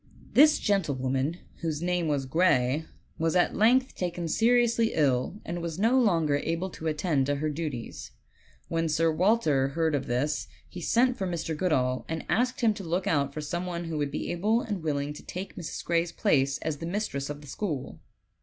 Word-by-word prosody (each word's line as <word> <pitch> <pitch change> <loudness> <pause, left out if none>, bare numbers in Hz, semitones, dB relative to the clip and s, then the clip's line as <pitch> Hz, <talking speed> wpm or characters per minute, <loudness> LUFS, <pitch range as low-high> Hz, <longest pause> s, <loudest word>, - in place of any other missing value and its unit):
This 300 +3 +7
gentlewoman, 140 -5 0 0.2
whose 160 -1 -3
name 180 -1 0
was 145 -3 0
Gray, 145 -1 +2 0.3
was 165 +1 +1
at 180 - +3
length 255 +5 +3
taken 175 -1 -3
seriously 230 +4 +3
ill, 140 +5 +1
and 175 +1 -4
was 165 -1 -4
no 230 +6 +3
longer 165 -10 +2
able 165 +5 -2
to 160 - -6
attend 150 -3 +1
to 145 - +1
her 155 +2 -1
duties. 145 -6 -5 0.6
When 165 0 -1
Sir 165 +1 +2
Walter 160 -6 +2
heard 160 +3 0
of 140 -2 -1
this 145 +5 -1 0.2
he 180 - -9
sent 245 +7 +2
for 190 - -2
Mr. 165 -2 -3
Goodall 130 -7 +1
and 160 0 -3
asked 250 +2 +1
him 225 -2 +4
to 205 -2 -8
look 175 +3 -1
out 140 -7 +1
for 155 - -5
some 175 +4 -3
one 170 -1 -3
who 165 -2 -4
would 145 -1 0
be 145 - -3
able 210 +7 +1
and 205 -7 -4
willing 145 -2 -2
to 150 - -11
take 185 +2 -7
Mrs. 170 - -6
Gray's 170 0 +1
place 140 -9 +2
as 155 -1 -3
mistress 165 -6 -3
of 145 0 -6
the 145 - -13
school. 150 -2 -4
165 Hz, 190 wpm, -28 LUFS, 145-190 Hz, 0.6 s, This